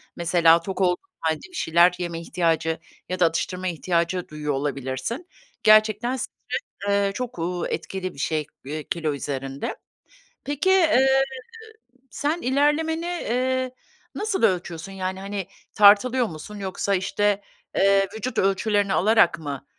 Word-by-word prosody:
Mesela, 170 Hz, -1 st, +4 dB
tok 190 Hz, +2 st, -4 dB
olduğun 180 Hz, -1 st, +3 dB, 0.2 s
hâlde 160 Hz, -1 st, 0 dB
bir 365 Hz, -, -14 dB
şeyler 170 Hz, -, +4 dB
yeme 170 Hz, -2 st, -4 dB
ihtiyacı 165 Hz, -1 st, 0 dB, 0.3 s
ya 185 Hz, 0 st, -3 dB
da 175 Hz, -, +5 dB
atıştırma 180 Hz, +3 st, -1 dB
ihtiyacı 175 Hz, +1 st, -1 dB
duyuyor 150 Hz, -1 st, -3 dB
olabilirsin. 140 Hz, -, -3 dB, 0.4 s
Gerçekten 215 Hz, +3 st, +4 dB
stres, 260 Hz, -, -5 dB, 0.6 s
eee, 200 Hz, 0 st, +2 dB
çok, 250 Hz, -3 st, -5 dB
uuu, 175 Hz, +1 st, -2 dB
etkili 185 Hz, -1 st, -4 dB
bir -, -, -16 dB
şey, 155 Hz, 0 st, -1 dB, 0.2 s
eee, 150 Hz, +2 st, -5 dB
kilo 160 Hz, -3 st, -1 dB
üzerinde. 135 Hz, -1 st, -4 dB, 0.7 s
Peki, 290 Hz, +5 st, -1 dB
eee, 270 Hz, -8 st, +5 dB, 0.9 s
sen 300 Hz, +7 st, -2 dB
ilerlemeni, 295 Hz, +5 st, +1 dB
eee, 260 Hz, -6 st, -1 dB, 0.4 s
nasıl 420 Hz, -, -2 dB
ölçüyorsun, 180 Hz, -3 st, 0 dB
yani, 190 Hz, 0 st, -4 dB
hani, 195 Hz, -1 st, -5 dB, 0.3 s
tartılıyor 215 Hz, +5 st, +6 dB
musun 160 Hz, +5 st, -9 dB
yoksa, 195 Hz, 0 st, -1 dB
işte, 205 Hz, +2 st, 0 dB, 0.4 s
eee, 195 Hz, 0 st, +4 dB
vücut 225 Hz, +2 st, -4 dB
ölçülerini 200 Hz, +1 st, +2 dB
alarak 215 Hz, -3 st, +4 dB
mı, 145 Hz, -4 st, -6 dB
190 Hz, 130 wpm, -24 LUFS, 165-235 Hz, 0.9 s, tartılıyor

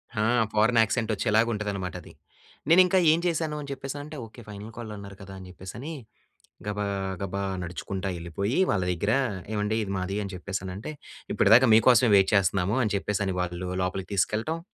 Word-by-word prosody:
హా! 105 Hz, -, +1 dB, 0.3 s
Foreign 115 Hz, +2 st, +4 dB
accent 110 Hz, +1 st, 0 dB
వచ్చేలాగా 110 Hz, +3 st, +2 dB
ఉంటది 105 Hz, -1 st, -3 dB
అన్నమాట 95 Hz, -2 st, -4 dB
అది. -, -, -14 dB, 0.6 s
నేను 180 Hz, +3 st, +8 dB
ఇంకా 185 Hz, +1 st, +2 dB
ఏం 165 Hz, -, +3 dB
చేశాను 160 Hz, -3 st, 0 dB
అని 140 Hz, -, -8 dB
చెప్పేసని 135 Hz, +1 st, -5 dB
అంటే, 150 Hz, 0 st, -9 dB
ఓకె 115 Hz, +2 st, -13 dB
ఫైనల్ 105 Hz, +2 st, -8 dB
కాల్ 115 Hz, -2 st, -6 dB
అన్నారు 100 Hz, -1 st, -9 dB
కదా! 95 Hz, 0 st, -10 dB
అని 95 Hz, -, -10 dB
చెప్పేసని 115 Hz, -, -8 dB, 0.7 s
గబా, 105 Hz, 0 st, -2 dB, 0.4 s
గబా 100 Hz, +1 st, -3 dB, 0.2 s
నడుచుకుంటా 95 Hz, +2 st, -4 dB
ఎళ్ళిపోయి, 100 Hz, -, -2 dB
వాళ్ళ 95 Hz, -3 st, +1 dB
దగ్గర 100 Hz, +5 st, 0 dB, 0.4 s
ఏవండీ 105 Hz, +1 st, 0 dB
ఇది 100 Hz, -, -5 dB
మాది 95 Hz, +2 st, -3 dB
అని 100 Hz, -, -6 dB
చెప్పేసి 95 Hz, +1 st, -4 dB
అనంటే, 95 Hz, +10 st, -6 dB, 0.4 s
"ఇప్పటిదాకా 115 Hz, +5 st, +6 dB
మీకోసమే 120 Hz, +1 st, +6 dB
వెయిట్ 95 Hz, -1 st, +5 dB
చేస్తున్నాము" 95 Hz, +2 st, +2 dB
అని 105 Hz, -, 0 dB
చెప్పేసి 100 Hz, 0 st, -1 dB
అని 95 Hz, -, -1 dB
వాళ్ళు 90 Hz, 0 st, -3 dB
లోపలికి 90 Hz, +1 st, -3 dB
తీసుకెళ్ళటం. 110 Hz, -, 0 dB
105 Hz, 175 wpm, -27 LUFS, 95-115 Hz, 0.7 s, నేను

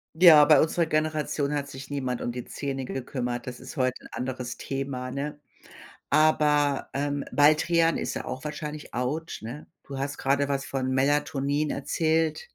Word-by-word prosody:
Ja, 160 Hz, -3 st, +9 dB
bei 150 Hz, -1 st, +6 dB
unserer 165 Hz, +1 st, +2 dB
Generation 155 Hz, -2 st, 0 dB
hat 140 Hz, -1 st, -2 dB
sich 135 Hz, 0 st, -9 dB
niemand 130 Hz, -4 st, -2 dB
um 120 Hz, -, -2 dB
die 125 Hz, 0 st, -6 dB
Zähne 135 Hz, -2 st, -4 dB
gekümmert. 125 Hz, -1 st, -4 dB
Das 125 Hz, -1 st, -7 dB
ist 130 Hz, +4 st, -10 dB
heute 130 Hz, -1 st, 0 dB
'n -, -, -12 dB
anderes 125 Hz, -1 st, -4 dB
Thema, 135 Hz, -2 st, -4 dB
ne? 145 Hz, +2 st, -4 dB, 0.7 s
Aber, 150 Hz, -2 st, +3 dB
ähm, 145 Hz, 0 st, -2 dB
Baldrian 160 Hz, +4 st, +4 dB
ist -, -, -3 dB
ja -, -, -4 dB
auch 130 Hz, +3 st, -6 dB
wahrscheinlich 150 Hz, 0 st, -6 dB
autsch, 140 Hz, +7 st, -3 dB
ne? 120 Hz, +7 st, -8 dB, 0.2 s
Du 140 Hz, -, -7 dB
hast 140 Hz, +1 st, -3 dB
gerade 140 Hz, +1 st, +1 dB
was 140 Hz, -1 st, -1 dB
von 130 Hz, -1 st, -2 dB
Melatonin 145 Hz, +1 st, +1 dB
erzählt. 160 Hz, -, 0 dB
140 Hz, 165 wpm, -27 LUFS, 130-150 Hz, 0.7 s, Ja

